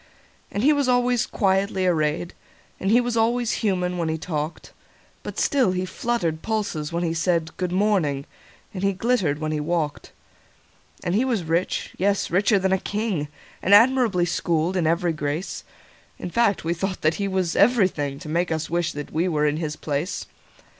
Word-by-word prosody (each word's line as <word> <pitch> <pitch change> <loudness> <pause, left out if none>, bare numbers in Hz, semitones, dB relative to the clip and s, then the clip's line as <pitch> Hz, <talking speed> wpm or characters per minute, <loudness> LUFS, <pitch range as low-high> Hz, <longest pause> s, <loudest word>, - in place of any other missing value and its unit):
And 205 - -2
he 300 +3 +6
was 285 -2 +1
always 245 -1 +2
quietly 195 -1 +1
arrayed, 160 -1 0 0.5
And 195 - -1
he 230 +3 +6
was 245 -1 -1
always 235 +1 +2
human 180 -4 0
when 165 -1 0
he 160 - -1
talked; 155 0 -5 0.5
But - - -7
still 260 -10 +2
he 185 0 -1
fluttered 185 -6 -2
pulses 205 -9 -2
when 170 +1 -1
he 165 -1 0
said,"Good 170 +1 -1
morning," 180 -8 +1 0.5
and 185 - -5
he 195 0 +2
glittered 190 -8 +1
when 155 0 -3
he 155 - -1
walked. 155 -1 -2 0.9
And 175 - -1
he 220 +6 +3
was 235 -8 0
rich—yes, 180 +4 -1
richer 200 +4 +3
than 190 0 +1
a 190 - +2
king—And 195 -3 -1
admirably 230 -5 +4
schooled 170 +1 0
in 170 -4 +1
every 170 +1 +1
grace:In 155 +3 -6
fine, 230 -2 +3
we 165 +1 0
thought 190 +2 -3
that 155 +1 +3
he 200 - 0
was 185 -3 0
everythingTo 185 - +2
make 165 +3 -1
us 160 0 -2
wish 170 -1 0
that 145 0 -7
we 165 +4 +1
were 150 -4 +1
in 150 0 +1
his 155 -2 -3
place. 150 +5 -3
180 Hz, 165 wpm, -24 LUFS, 160-205 Hz, 0.9 s, he